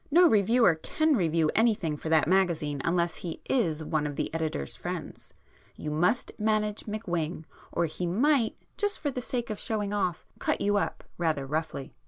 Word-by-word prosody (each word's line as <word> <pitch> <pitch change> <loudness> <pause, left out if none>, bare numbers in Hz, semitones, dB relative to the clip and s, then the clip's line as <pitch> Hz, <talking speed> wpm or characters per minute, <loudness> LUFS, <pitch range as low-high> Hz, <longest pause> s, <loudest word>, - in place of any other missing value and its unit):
No 345 +4 +7
reviewer 225 - +5
can 310 -1 +2
review 165 -5 +2
anything 210 -9 +2
for 155 - -5
that 160 -1 +4
magazine 165 -6 +1
unless 170 0 +1
he 170 -3 -6
is 165 - +1
one 155 -1 0
of 145 - -5
the - - -3
editor's 155 - -2
friends.2 - - -6 0.4
You 150 - -5
must 175 +10 +1
manage 210 -1 0
McWhing, 175 -7 -2 0.3
or 170 - +1
he 175 +2 -3
might, 240 - +2 0.2
just 410 -1 0
for 290 - -2
the 250 - -4
sake 240 -1 -3
of 210 - -4
'showing 210 -2 -2
off,' 185 -5 -1
cut - - 0
you 205 0 +2
up - - -2 0.2
rather 155 -5 0
roughly." 155 -1 -3
180 Hz, 175 wpm, -28 LUFS, 160-220 Hz, 0.4 s, No